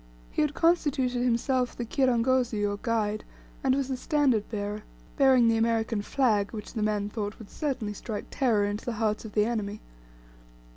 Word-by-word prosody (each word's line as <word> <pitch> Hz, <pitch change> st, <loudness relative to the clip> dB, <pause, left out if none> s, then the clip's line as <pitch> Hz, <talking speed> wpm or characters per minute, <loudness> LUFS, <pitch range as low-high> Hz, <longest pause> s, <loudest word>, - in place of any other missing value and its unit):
He -, -, 0 dB
had 300 Hz, -1 st, 0 dB
constituted 275 Hz, -7 st, +2 dB
himself 250 Hz, +1 st, +1 dB
the 240 Hz, -, -3 dB
kirangozi 245 Hz, -3 st, +2 dB
or 205 Hz, 0 st, -1 dB
guide, 215 Hz, -3 st, 0 dB, 0.4 s
and 260 Hz, -1 st, +3 dB
was 275 Hz, -1 st, -1 dB
the 265 Hz, -, -2 dB
standard 260 Hz, -6 st, +1 dB
bearer, 210 Hz, -1 st, -3 dB, 0.3 s
bearing 260 Hz, -4 st, +5 dB
the 225 Hz, 0 st, +3 dB
American 225 Hz, -1 st, +1 dB
flag, 210 Hz, -4 st, +1 dB
which 215 Hz, -2 st, -7 dB
the 225 Hz, -, -2 dB
men 210 Hz, -1 st, 0 dB
thought 210 Hz, 0 st, -4 dB
would 220 Hz, -, -12 dB
certainly 260 Hz, -9 st, -2 dB
strike 210 Hz, +1 st, -5 dB
terror 225 Hz, -7 st, +2 dB
into 205 Hz, +1 st, -3 dB
the 240 Hz, -, -3 dB
hearts 215 Hz, 0 st, -1 dB
of 215 Hz, -, -8 dB
the 210 Hz, -1 st, +3 dB
enemy. 215 Hz, -3 st, -2 dB
230 Hz, 175 wpm, -28 LUFS, 210-260 Hz, 0.4 s, bearing